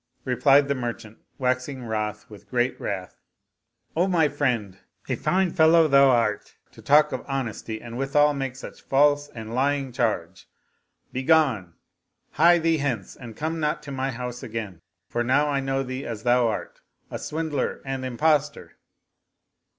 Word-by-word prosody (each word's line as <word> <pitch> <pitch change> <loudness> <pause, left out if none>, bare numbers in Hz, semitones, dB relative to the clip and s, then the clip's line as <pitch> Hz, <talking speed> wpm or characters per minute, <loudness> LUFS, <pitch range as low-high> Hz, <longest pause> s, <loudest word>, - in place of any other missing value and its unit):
Replied 140 +2 +4
the 140 - +1
merchant, 120 -4 -6 0.2
waxing 130 +1 -1
wroth 105 -1 -3
with 105 -2 -15
great 125 0 0
wrath, 95 -2 -5 0.4
" - - -47
O 175 +4 +2
my 165 -5 +3
friend, 120 -10 -1 0.3
a - - 0
fine 185 -1 +1
fellow 160 -1 +5
thou 140 -1 +6
art 115 -4 0 0.2
to - - -15
talk 150 +2 +4
of 130 - -4
honesty 120 -5 -4
and 120 +1 -8
withal 145 +2 +3
make 135 -2 -4
such 135 - -10
false 145 +1 +3
and 110 -1 -8
lying 135 +1 0
charge. 100 -7 -2 0.7
Begone: 130 - +2 0.6
hie 170 +2 +5
thee 165 -1 +2
hence 125 -9 -3
and 115 -4 -11
come 160 +2 -2
not 150 -1 -1
to 140 - -8
my 135 0 -2
house 125 -1 -5
again; 105 -6 -6 0.3
for 120 - -1
now 140 +5 +2
I 140 -1 0
know 135 0 -1
thee 130 +1 -5
as 115 -2 -6
thou 120 -1 +3
art, 110 - -5 0.3
a - - -4
swindler 155 -3 -2
and 135 -1 -4
impostor." 145 +3 0
130 Hz, 160 wpm, -25 LUFS, 115-145 Hz, 0.7 s, thou